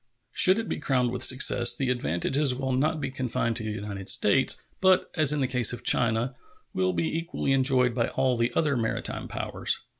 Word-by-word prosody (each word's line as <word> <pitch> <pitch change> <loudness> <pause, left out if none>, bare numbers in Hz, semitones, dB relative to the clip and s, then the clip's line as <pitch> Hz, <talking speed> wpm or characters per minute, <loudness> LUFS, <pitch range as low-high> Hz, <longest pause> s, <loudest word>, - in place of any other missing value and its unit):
Should 185 +2 +5
it 225 -1 -4
be - - -4
crowned 125 -3 -1
with 125 - -2
success, 125 -2 +5
the 130 -2 -2
advantages 125 - 0
will 130 0 -4
not 155 +5 -1
be 135 - -5
confined 125 -3 -3
to 115 - -6
the 110 - -4
United 100 -2 -6
States, 130 +6 +2 0.2
but, 185 -1 +2
as 155 -4 +3
in 150 -1 -1
the 130 - 0
case 125 -2 +2
of 120 - -8
China, 120 +2 +1 0.4
will 95 0 0
be 85 - -2
equally 165 -4 -3
enjoyed 130 -2 +2
by 115 -1 -1
all 130 -1 -1
the 115 +1 -1
other 150 -3 0
maritime 115 -2 -3
powers. - - -2
125 Hz, 200 wpm, -25 LUFS, 115-135 Hz, 0.4 s, Should